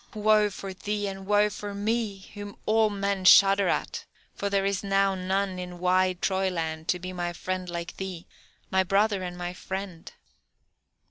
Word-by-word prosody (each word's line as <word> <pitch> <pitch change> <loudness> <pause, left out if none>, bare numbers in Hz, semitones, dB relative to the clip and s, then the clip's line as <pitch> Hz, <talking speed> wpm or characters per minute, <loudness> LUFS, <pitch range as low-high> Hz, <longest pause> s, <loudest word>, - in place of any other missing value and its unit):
woe 215 0 +4
for 195 -1 -7
thee, 205 +2 -3
and 195 -1 -7
woe 210 0 +4
for 205 -1 -6
me, 210 -1 -1
whom 205 0 -8
all 220 0 +3
men 200 -1 -2
shudder 195 +2 +7
at, - - -1 0.3
for 200 - -3
there 195 -1 +1
is 195 0 -1
now 195 0 +2
none 190 0 -1
in 180 -1 -6
wide 185 0 +2
Troyland 170 -4 -1
to 180 - +2
be 185 +1 -7
my 175 -1 -2
friend 185 +1 -4
like 170 0 -5
thee, 185 -3 -6 0.5
my 190 0 +3
brother 200 +1 +2
and 180 -1 -5
my 175 0 -4
friend!" 190 -2 -6
195 Hz, 165 wpm, -27 LUFS, 180-200 Hz, 0.5 s, shudder